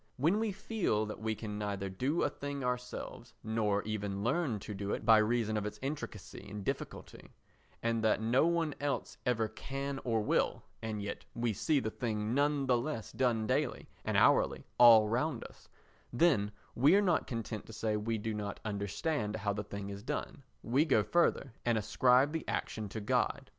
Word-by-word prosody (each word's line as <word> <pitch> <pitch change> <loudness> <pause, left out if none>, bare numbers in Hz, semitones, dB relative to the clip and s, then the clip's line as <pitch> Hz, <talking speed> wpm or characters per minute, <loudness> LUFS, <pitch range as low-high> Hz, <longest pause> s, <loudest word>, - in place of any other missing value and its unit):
When 165 +10 +2
we 220 -1 0
feel 195 - -1
that 105 -1 -6
we 110 0 -1
can 105 -1 -5
neither 100 -2 -2
do 130 - 0
a - - +2
thing 140 -1 -5
ourselves, 125 0 -4
nor 105 -2 0
even 100 -2 -3
learn 135 -1 +1
to 105 - -6
do 100 0 -3
it - - -4
by 110 -1 +7
reason 110 0 +1
of 105 - -2
its 105 - -7
intricacy 135 - -5
and 105 -1 -6
difficulty, - - -5 0.5
and 115 -1 0
that 110 - +3
no 120 +8 +3
one 165 -3 +1
else 145 -1 -2
ever 115 -3 +2
can 135 +4 -5
or 115 -2 +1
will, 105 - +1 0.2
and 110 -2 -3
yet 100 - -5
we 115 -1 0
see 145 +9 +2
the 110 -4 -3
thing 110 -2 -2
none 145 0 +2
the 125 -2 +3
less 120 -4 -4
done 120 -4 +1
daily - - -1 0.2
and - - 0
hourly - - +4
all 115 -3 +9
round 125 +3 -1
us, - - -14 0.4
then 120 -7 +3 0.2
we 145 +9 +5
are 205 - +5
not 175 -4 +2
content 115 -3 -4
to 110 - -10
say 110 0 -1
we 110 +2 -1
do 110 +1 -3
not 105 -1 -4
understand 105 - -2
how 105 -1 -1
the 105 +1 -3
thing 100 -1 -6
is 100 0 -7
done, 140 +3 -4 0.2
we 130 +6 +3
go 110 -10 +3
further 170 -6 +1
and 120 -2 +2
ascribe 125 +6 +4
the 160 -1 -4
action 110 -2 -3
to 110 - -5
God. 130 +4 0
115 Hz, 190 wpm, -33 LUFS, 105-140 Hz, 0.5 s, all